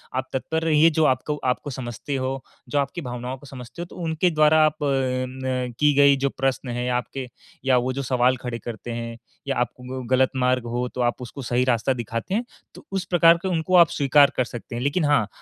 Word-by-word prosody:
आप 130 0 -2
तत्पर 160 +5 -1
रहिए, 160 0 +5
जो 160 0 +1
आपको 130 +3 +1
आपको 130 +3 -1
समझती 130 +1 -5
हो, 130 0 -3 0.3
जो 145 - +1
आपकी 140 +5 -2
भावनाओं 125 -1 -5
को 145 - -16
समझते 125 +2 -9
हों, 175 - -4
तो - - -14
उनके 165 +2 +1
द्वारा 155 0 +4
आप 155 0 +1
न 130 -2 -1
की 150 -1 +4
गई 140 -1 +6
जो 140 - +3
प्रश्न 135 -1 -2
है 125 - -2
आपके 125 +1 -3 0.4
या 130 -2 +4
वो 125 +1 0
जो 140 - -3
सवाल 125 0 +2
खड़े 120 -2 -5
करते 120 0 -7
हैं 115 0 -5 0.3
या 135 - 0
आपको 125 +2 -4
ग 120 - -10
गलत 130 0 +4
मार्ग 125 -1 +1
हो, 120 +1 -2
तो 125 - -5
आप 120 +1 0
उसको 125 +3 -8
सही 125 0 +1
रास्ता 125 +1 +2
दिखाते 115 - -4
हैं, 225 - +1 0.3
तो - - -13
उस 195 -1 -2
प्रकार 170 -2 +5
का 190 - -1
उनको 175 +1 0
आप 170 -3 +7
स्वीकार 140 0 +4
कर 130 - +3
सकते 120 0 -8
हैं। 120 - -3
लेकिन 150 +4 +1
हाँ, 145 -8 +3
130 Hz, 220 wpm, -23 LUFS, 125-150 Hz, 0.4 s, आप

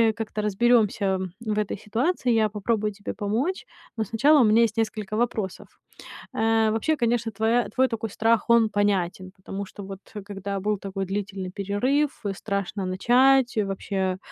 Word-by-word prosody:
как-то 215 -1 -4
разберёмся 210 -2 +2 0.2
в 215 -2 -3
этой 210 -1 -1
ситуации. 245 - 0
Я 220 -1 +3
попробую 210 +1 -1
тебе 205 0 -6
помочь. 235 - -2 0.3
Но 220 - -1
сначала 265 +8 +4
у - - +6
меня 220 +2 +5
есть 220 -1 0
несколько 215 -2 -2
вопросов. 220 -5 -2 0.7
Э, 225 0 +2
вообще, 265 +8 +1
конечно, 235 -3 0
твоя 225 +3 +1
твой 260 0 +2
такой 225 -1 -3
страх 225 +2 +1
он 230 -2 +5
понятен, 190 -3 0
потому 195 +1 -6
что 200 - -10
вот 195 0 -8 0.3
когда 200 -1 -4
был 210 +1 0
такой 195 0 -4
длительный 195 -1 -4
перерыв, 250 +11 -1
страшно 200 -1 -3
начать, 245 +6 +3
вообще, 195 -2 -1
215 Hz, 150 wpm, -25 LUFS, 195-230 Hz, 0.7 s, у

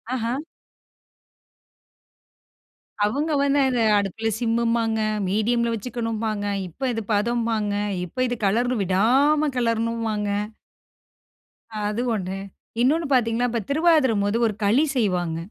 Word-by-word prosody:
அஹா. 235 -1 -1 2.7
அவங்க 290 +9 -1
வந்த 280 0 +2
அத, 255 -2 0 0.2
அடுப்புல 205 +3 -2
சிம்மும்பாங்க. 230 -1 +1 0.3
மீடியம்ல 235 +4 +1
வச்சுக்கணும்பாங்க. 225 -2 -3 0.2
இப்ப 255 +10 -3
இது 225 - -3
பதம்பாங்க. 225 -1 0 0.3
இப்ப 255 +9 -2
இது 245 - -2
கலரண் 240 +4 +1
விடாம 265 +11 +3
கேலரணுமாங்க. 230 -3 -1 1.6
அது 210 +3 -2
ஒன்னு. 190 -2 -3 0.4
இன்னொன்னு 310 +5 +2
பாத்தீங்கன்னா 240 -1 +2
இப்ப 235 -1 -2
திருவாதுர 310 -5 +4
போது 205 +3 0
1 215 - -2
களி 230 +10 +4
செய்வாங்க. 180 -8 0
230 Hz, 100 wpm, -23 LUFS, 210-250 Hz, 2.7 s, திருவாதுர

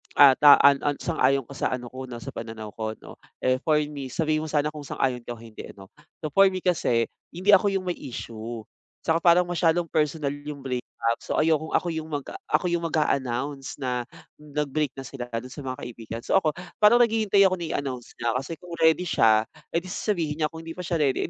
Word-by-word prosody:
at 140 -2 +8
ah, 145 -1 +11
an 140 -1 +7
an 145 -1 0
sang-ayon 135 -5 +2
ka 140 - -11
sa - - 0
ano 125 -1 -5
ko 130 0 -7
'no, 120 - -6
sa - - -6
pananaw 110 -1 -7
ko 110 0 -3
'no? - - -13 0.2
Eh, 130 0 +2
for 155 0 +3
me, 145 -3 -6
sabihin 155 +1 0
mo - - -5
sana 150 0 +1
kung 150 -1 -8
sang-ayon 130 -2 -1
ka 120 - -6
o 115 - -15
hindi, 115 -2 -10
ano? 95 -1 -13 0.3
So, 155 - -3
for 195 +3 +7
me 185 -1 -5
kasi 120 -10 +2 0.2
hindi 185 +4 +1
ako 200 +1 +6
yung 185 - -6
may 175 - -2
issue 115 -2 -7 0.4
tsaka 165 0 +2
parang 175 +1 +5
masyadong 175 -1 +1
personal 150 -2 0
yung 145 -1 -8
breakup. 125 -2 -3 0.3
So, - - -3
ayokong 155 0 +2
ako - - -3
yung 160 0 -5
mag-a 145 -3 -5 0.2
ako 150 +3 +2
yung 170 -1 -1
mag-a-announce 135 -2 -1
na 125 -3 -2 0.4
nag-break 150 0 -2
na 135 - -6
sila 120 -1 -7
dun 120 +2 -5
sa 145 - -8
mga 130 -2 -5
kaibigan. 115 -1 -7
So, - - -1
ako, 155 - +2 0.3
parang 210 +3 +7
naghihintay 220 -4 +4
ako 190 - +3
na 170 -3 -4
i-announce 130 -4 -6
niya 115 -1 0
kasi 135 +6 -4
kung 175 +2 -11
ready 160 +2 +4
siya, 110 -9 +4 0.2
eh, - - -1
di 170 - -2
sasabihin 170 -5 -2
niya, 155 - +2
kung 160 +1 -10
hindi 165 - -6
pa 180 - -7
siya 175 -1 -1
ready, 140 -4 +1
145 Hz, 220 wpm, -25 LUFS, 130-165 Hz, 0.4 s, ah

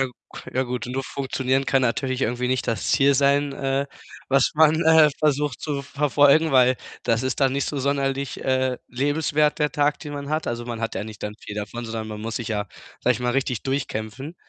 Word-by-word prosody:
Ja 135 - +2
k 125 - -12 0.4
ja, 130 - +2
gut, 125 0 -4
nur 130 +2 -3
funktionieren 135 0 -1
kann 135 -1 +2
natürlich 130 +2 0
irgendwie 125 +2 -1
nicht 130 0 0
das 115 -3 -2
Ziel 140 0 +4
sein, 140 +1 +2
äh, 135 0 -1 0.4
was 135 -1 +3
man, 160 +1 +4
äh, 160 -2 +6
versucht 150 -3 0
zu 145 -2 -3
verfolgen, 145 +2 +3
weil 130 0 +5 0.3
das 115 0 +1
ist 130 +1 -2
dann 135 -1 +3
nicht 140 0 -1
so 145 - -3
sonderlich, 140 0 -1
äh, 130 -1 +1
lebenswert, 150 +3 +1
der 150 -1 +1
Tag, 145 0 +1
den 145 - -7
man 140 -1 -6
hat. 155 0 -1
Also, 120 0 -3
man 120 -2 -5
hat 115 - -3
ja 95 - -3
nicht 110 -1 -10
dann 105 0 -4
viel 105 - -8
davon, 105 +3 -5
sondern 110 -1 -5
man 105 -1 -6
muss 115 +1 -4
sich 115 - -4
ja, 105 -2 -2 0.3
sage - - +3
ich - - -6
mal, 125 - 0
richtig 130 -2 -1
durchkämpfen. 135 +2 -4
135 Hz, 215 wpm, -23 LUFS, 120-145 Hz, 0.4 s, äh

